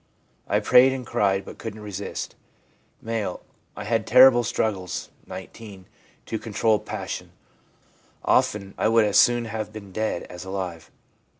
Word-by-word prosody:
I -, -, +2 dB
prayed 130 Hz, +1 st, +6 dB
and 130 Hz, -2 st, -5 dB
cried, 100 Hz, -2 st, +1 dB
but -, -, -11 dB
couldn't 110 Hz, -1 st, -7 dB
resist/ 100 Hz, -1 st, -5 dB, 0.7 s
M. 115 Hz, -2 st, -2 dB, 0.2 s
' -, -, -40 dB
I 105 Hz, -, -5 dB
had 110 Hz, +1 st, -1 dB
terrible 125 Hz, 0 st, +7 dB
struggles 105 Hz, -5 st, -2 dB, 0.2 s
(19) 95 Hz, 0 st, -10 dB, 0.4 s
to 110 Hz, -, -3 dB
control 110 Hz, 0 st, +1 dB
passion. -, -, -6 dB, 0.9 s
Often 100 Hz, -2 st, +1 dB
I -, -, +3 dB
would 115 Hz, 0 st, +4 dB
as 105 Hz, -, +4 dB
soon 120 Hz, -1 st, +4 dB
have 110 Hz, -1 st, -5 dB
been 105 Hz, -3 st, -10 dB
dead 110 Hz, -2 st, -2 dB
as 90 Hz, 0 st, -9 dB
alive. 95 Hz, -4 st, -5 dB
110 Hz, 140 wpm, -24 LUFS, 95-115 Hz, 0.9 s, terrible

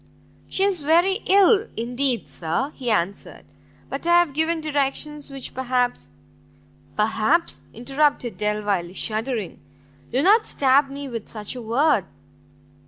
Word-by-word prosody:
"She 385 Hz, -, 0 dB
is 390 Hz, -5 st, +1 dB
very 345 Hz, +7 st, +3 dB
ill, 400 Hz, +3 st, +5 dB
indeed, 245 Hz, +2 st, -1 dB
sir," 180 Hz, -, -3 dB
he 250 Hz, -2 st, -4 dB
answered, 200 Hz, -2 st, -2 dB, 0.4 s
"but 275 Hz, +5 st, -5 dB
I 345 Hz, 0 st, +6 dB
have 345 Hz, -5 st, +1 dB
given 320 Hz, +3 st, +1 dB
directions 295 Hz, 0 st, -2 dB
which 270 Hz, -2 st, -7 dB
perhaps 250 Hz, -1 st, -1 dB, 0.4 s
" -, -, -31 dB
"Perhaps!" 220 Hz, +10 st, +1 dB
interrupted 270 Hz, 0 st, 0 dB
Delvile, 205 Hz, -4 st, -1 dB
shuddering, 220 Hz, -2 st, -3 dB, 0.5 s
"do 260 Hz, +3 st, +1 dB
not 425 Hz, +5 st, +5 dB
stab 275 Hz, +1 st, +3 dB
me 280 Hz, +1 st, -6 dB
with 230 Hz, -4 st, -6 dB
such 210 Hz, -2 st, -5 dB
a 250 Hz, -, -6 dB
word!" 235 Hz, -, +2 dB
270 Hz, 130 wpm, -23 LUFS, 225-310 Hz, 0.5 s, I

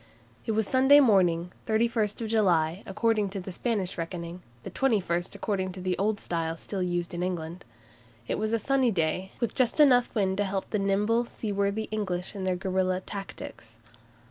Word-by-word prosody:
It 220 Hz, -, +1 dB
was 215 Hz, -1 st, +1 dB
Sunday 265 Hz, +2 st, +6 dB
morning, 180 Hz, -8 st, +3 dB, 0.2 s
31 225 Hz, 0 st, +2 dB, 0.2 s
July, 180 Hz, -6 st, +2 dB
according 215 Hz, 0 st, +1 dB
to 195 Hz, +1 st, -5 dB
the 190 Hz, +1 st, -7 dB
Spanish 195 Hz, -3 st, -2 dB
reckoning, 170 Hz, +1 st, -5 dB, 0.2 s
the -, -, -7 dB
21st 190 Hz, -9 st, 0 dB
according 190 Hz, -3 st, -2 dB
to 190 Hz, -, -9 dB
the 185 Hz, 0 st, -1 dB
Old 205 Hz, +1 st, +1 dB
Style 165 Hz, -1 st, -2 dB
still 195 Hz, +3 st, -4 dB
used 175 Hz, -1 st, -2 dB
in 175 Hz, -, -3 dB
England. 175 Hz, -1 st, -4 dB, 0.6 s
It -, -, -1 dB
was 215 Hz, +1 st, -1 dB
a 230 Hz, -, +3 dB
sunny 265 Hz, +2 st, +2 dB
day, 185 Hz, 0 st, -1 dB
with 235 Hz, -, -1 dB
just 255 Hz, +2 st, +1 dB
enough 250 Hz, -5 st, +5 dB
wind 190 Hz, -3 st, +1 dB
to 205 Hz, -, +2 dB
help 195 Hz, -1 st, -2 dB
the 210 Hz, -, +1 dB
nimble, 210 Hz, +4 st, +1 dB
seaworthy 200 Hz, -1 st, -2 dB
English 185 Hz, -5 st, -2 dB
ships -, -, -11 dB
in 190 Hz, -2 st, -4 dB
their 185 Hz, -1 st, +1 dB
guerilla 185 Hz, 0 st, 0 dB
tactics. 185 Hz, -, -8 dB
195 Hz, 175 wpm, -28 LUFS, 180-220 Hz, 0.6 s, Sunday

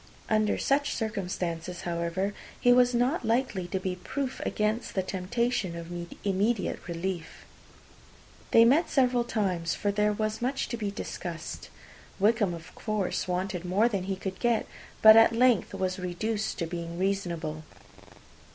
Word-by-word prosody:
Under 215 Hz, -1 st, +2 dB
such 285 Hz, +1 st, +1 dB
circumstances, 180 Hz, -5 st, -3 dB
however, 170 Hz, +3 st, -2 dB, 0.3 s
he 245 Hz, -, +5 dB
was 245 Hz, 0 st, +4 dB
not 250 Hz, +7 st, +1 dB
likely 225 Hz, -5 st, 0 dB
to 190 Hz, +2 st, -2 dB
be 185 Hz, -1 st, -3 dB
proof 265 Hz, +7 st, -4 dB
against 215 Hz, +2 st, -1 dB
the 190 Hz, -, +1 dB
temptation 190 Hz, +1 st, -1 dB
of 170 Hz, +1 st, -7 dB, 0.3 s
immediate 200 Hz, +2 st, 0 dB
relief. 170 Hz, 0 st, -4 dB, 1.0 s
They 230 Hz, -, +7 dB
met 285 Hz, +9 st, +4 dB
several 250 Hz, -3 st, +3 dB
times, 185 Hz, -8 st, -1 dB
for 205 Hz, -, 0 dB
there 210 Hz, +1 st, +2 dB
was 215 Hz, +1 st, -2 dB
much 265 Hz, +3 st, -1 dB
to -, -, -2 dB
be 210 Hz, -3 st, -2 dB
discussed. 170 Hz, -4 st, -6 dB, 0.5 s
Wickham, 205 Hz, -3 st, +3 dB
of 165 Hz, +2 st, -12 dB
course, 215 Hz, -5 st, -2 dB
wanted 180 Hz, 0 st, -2 dB
more 190 Hz, +6 st, +3 dB
than 200 Hz, -6 st, -2 dB
he 195 Hz, 0 st, -1 dB
could 190 Hz, 0 st, -6 dB
get; 240 Hz, -2 st, +2 dB, 0.4 s
but 220 Hz, 0 st, +11 dB
at 225 Hz, 0 st, +7 dB
length 245 Hz, -5 st, +3 dB
was 185 Hz, -1 st, -2 dB
reduced 205 Hz, +5 st, -2 dB
to 170 Hz, -, -1 dB
be 170 Hz, +1 st, -4 dB
reasonable. 170 Hz, -3 st, -2 dB
200 Hz, 145 wpm, -28 LUFS, 180-230 Hz, 1.0 s, but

